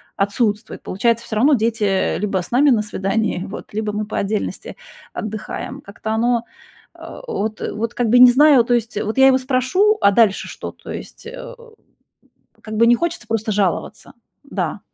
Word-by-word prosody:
отсутствует. 205 +2 -1
Получается, 230 +4 0
всё 220 - -5
равно 275 +7 +4
дети, 225 -2 0
э, 195 -2 +1
либо 195 -2 -1
с 175 - -10
нами 275 +3 +4
на 220 -3 +3
свидании 205 -1 -2
вот, 200 - -9
либо 215 0 -2
мы 210 0 -2
по - - -4
отдельности 210 +1 -3 0.4
отдыхаем. 220 +5 -6
Как-то 205 +2 -8
оно, 235 +1 +1 0.5
э, - - -10
вот, 215 - -3
э, - - -3
вот 225 +2 -4
как 240 -3 -1
бы 245 - +5
и - - +6
не 250 0 +9
знаю. 285 -1 +6
То 245 +1 0
есть, 235 -2 -1
э, - - -1
вот 220 +5 -2
я 265 - +8
его 260 -1 +5
спрошу, 265 - +1
а 200 - +6
дальше 210 -2 +2
что? - - -7
То - - -15
есть, - - -9
э, - - -9 1.1
как 215 0 -7
бы, 230 +1 +5
не 240 - +6
хочется 335 -6 -4
просто 225 -1 -2
жаловаться. 195 -3 -2 0.3
Да. - - -4
225 Hz, 195 wpm, -19 LUFS, 210-250 Hz, 1.1 s, не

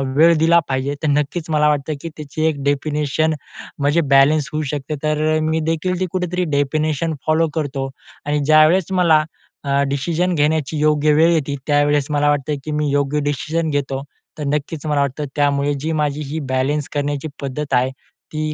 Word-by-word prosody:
वेळ 165 +3 +6
दिला 165 +2 +5
पाहिजे. 135 +2 -1
तर - - +1
नक्कीच 150 +3 -1
मला 150 -1 +3
वाटतं 150 +1 -1
की 165 - -5
त्याची 155 +1 -3
एक 145 -3 -1
डेफिनेशन 150 +2 0 0.5
म्हणजे 145 +4 +2
बॅलन्स 145 +2 +4
होऊ 155 - -1
शकते 145 +1 -3
तर 155 0 0 0.2
अ, - - 0
मी 160 +1 0
देखील 175 +3 -1
ती 185 - +1
कुठेतरी 180 -1 -1
डेफिनेशन 155 +3 0
फॉलो 160 +1 +3
करतो 140 -3 -2 0.4
आणि 150 0 0
ज्यावेळेस 155 +5 +4
मला 170 -5 +4 0.4
अ, 140 -1 +1
डिसिजन 170 +6 0
घेण्याची 150 0 0
योग्य 150 0 +3
वेळ 160 +3 +5
येते. 145 -3 -1
त्यावेळेस 145 -1 +2
मला 145 0 +2
वाटतं 145 0 0
की 155 - -4
मी 150 0 0
योग्य 145 +1 +1
डिसिजन 160 +3 -2
घेतो. 135 -2 -2 0.3
तर 150 - -4
नक्कीच 150 +1 -3
मला 150 -2 +1
वाटतं 140 +2 -2
त्यामुळे 145 0 +1
जी 160 +2 -2
माझी 150 0 -1
ही 160 - -2
बॅलन्स 135 +3 0
करण्याची 145 0 -2
पद्धत 140 +2 -4
आहे. 125 +1 +2 0.4
ती 155 0 -2
150 Hz, 175 wpm, -19 LUFS, 145-155 Hz, 0.5 s, वेळ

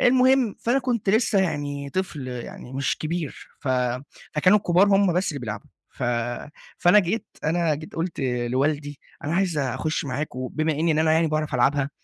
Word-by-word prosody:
المهم 255 -2 +4
فأنا 245 +4 +2
كنت 240 -6 0
لسه 220 -2 +3
يعني 145 -5 -2
طفل 150 -7 -3
يعني 125 0 -7
مش 135 0 -1
كبير، 160 -1 -4
ف - - -5 0.7
فكانوا 185 +7 +5
الكبار 185 0 +4
هم 195 -2 +4
بس 180 +3 +1
اللي 140 - -5
بيلعبوا، 115 +4 -5 0.2
ف - - -10 0.8
فأنا 180 +4 +6
جيت 205 +4 0 0.2
أنا 165 -1 +2
جيت 155 +2 -9
قُلْت 165 -1 -3
لوالدي: 135 +4 -1 0.3
"أنا 155 +3 -1
عايز 180 -4 +1
أخش 150 +5 -1
معاك 140 +1 -3
وبما 155 +5 -1
إني 160 +2 +1
إن 155 - 0
أنا 155 0 +3
يعني 165 +1 +3
باعرف 155 -2 -1
ألعبها، 140 +3 +2
155 Hz, 170 wpm, -24 LUFS, 140-185 Hz, 0.8 s, فأنا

